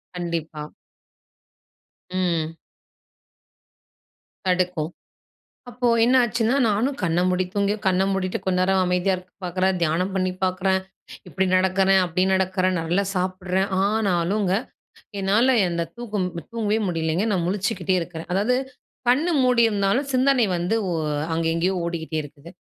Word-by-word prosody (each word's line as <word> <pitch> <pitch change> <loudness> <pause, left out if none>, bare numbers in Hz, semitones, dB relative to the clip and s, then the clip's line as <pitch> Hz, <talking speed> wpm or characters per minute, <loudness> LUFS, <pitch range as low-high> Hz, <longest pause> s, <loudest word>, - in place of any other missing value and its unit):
கண்டிப்பா. 165 -3 -4 1.4
ம். 170 -3 -1 1.9
தடுக்கும். 180 -3 0 0.8
அப்போ 245 +1 -2 0.2
என்னாச்சுன்னா, 240 0 +2
நானும் 235 +7 0
கண்ண 170 0 +1
மூடி 185 0 +1
தூங்கியோ, 200 +1 0
கண்ண 190 0 +3
மூடிட்டு 185 -1 -1
கொஞ்ச 185 -1 +1
நேரம் 190 0 +2
அமைதியா 180 +1 +1
இருக்க 180 0 -14
பார்க்குறேன். 185 +1 0
தியானம் 175 +4 0
பண்ணி 185 -1 0
பார்க்குறேன், 190 +1 +1 0.5
இப்பிடி 190 +4 0
நடக்கிறேன், 190 +1 +3
அப்பிடி 180 +2 0
நடக்கறேன், 185 -1 +1
நல்லா 175 +5 0
சாப்பிட்றேன். 185 +1 -1 0.2
ஆனாலுங்க, 200 -2 +1 0.7
என்னால 225 +7 +3
அந்த 170 -1 -2
தூக்கம் 215 -6 -3 0.2
தூங்கவே 220 -2 0
முடியலேங்க. 165 +3 0
நான் 175 -3 0
முழிச்சுக்கிட்டே 190 -2 -1
இருக்கிறேன். 165 0 -7
அதாவது 210 +7 +2 0.5
கண் 280 +7 +3 0.2
மூடியிருந்தாலும் 235 0 +2
சிந்தனை 260 -1 +3
வந்து 175 +6 0
ஒ - - -2 0.4
அங்க 165 0 -1
எங்கேயோ 180 +3 +1
ஓடிக்கிட்டே 160 -2 -4
இருக்குது. 145 +2 -13
185 Hz, 115 wpm, -23 LUFS, 175-205 Hz, 1.9 s, கண்ண